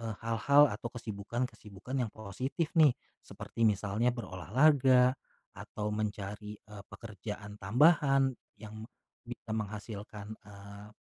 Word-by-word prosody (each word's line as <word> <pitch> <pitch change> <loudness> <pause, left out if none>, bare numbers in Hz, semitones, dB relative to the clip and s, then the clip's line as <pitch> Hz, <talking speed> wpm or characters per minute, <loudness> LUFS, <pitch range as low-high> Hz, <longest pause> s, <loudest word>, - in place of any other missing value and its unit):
eee, 115 -1 -4
hal-hal 140 +6 +5
atau 115 +3 -6
kesibukan 115 0 -4
kesibukan 110 +4 -8
yang 120 - 0
positif 130 - -3
nih, 150 -5 +7 0.3
seperti 115 - -4
misalnya 105 +4 +1
berolahraga, 125 - +3 0.5
atau 105 0 -4
mencari, 105 0 -4
eee, 105 -2 -12
pekerjaan 105 -1 -8
tambahan 135 - +4 0.3
yang 110 +1 -8 0.4
bisa 120 -2 -9
menghasilkan, 105 0 -6
eee, 100 0 -11
110 Hz, 110 wpm, -31 LUFS, 105-125 Hz, 0.5 s, nih